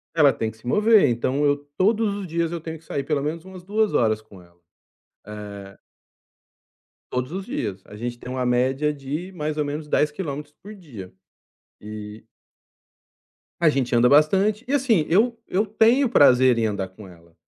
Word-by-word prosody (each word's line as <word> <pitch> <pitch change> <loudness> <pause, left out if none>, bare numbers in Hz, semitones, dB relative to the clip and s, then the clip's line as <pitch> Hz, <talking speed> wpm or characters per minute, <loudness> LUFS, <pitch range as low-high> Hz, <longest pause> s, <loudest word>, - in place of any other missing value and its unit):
ela 145 -4 +6
tem 110 0 -3
que 110 - -20
se 115 - -14
mover. 210 - +4
Então 130 +5 0
eu 145 0 +3 0.2
todos 210 +1 +2
os 200 -3 -6
dias 165 0 -1
eu 170 -2 -4
tenho 160 0 -6
que 160 - -22
sair 140 -2 -3
pelo 145 -1 -1
menos 160 +3 -4
umas 185 -2 -11
2 215 +2 0
horas 110 -2 +2
com 100 -4 -16
ela, 85 0 -23 0.7
eh 100 -2 -9 1.3
Todos 125 +3 -3
os 190 +1 -5
dias. 100 -3 -4
A 105 - -12
gente 120 +2 -5
tem 125 - -9
uma 130 -1 -2
média 130 +5 +1
de 150 +7 -6
mais 155 -2 -4
ou 150 - 0
menos 150 +1 -5
10 150 0 +1
quilômetros 150 -3 -6
por 210 +2 -10
dia. 120 - -11 0.7
E 105 +1 -9 1.4
A 165 - +5
gente 130 -4 0
anda 120 +1 +5
bastante. 195 - +3
E, 280 - -2
assim, 235 - +2
eu 230 +6 +3
eu 205 +4 0
tenho 230 +5 +3
prazer 130 - +5
em 115 - +1
andar 100 -3 -2
com 95 +1 -13
ela, 85 -2 -18
145 Hz, 180 wpm, -23 LUFS, 115-185 Hz, 1.4 s, ela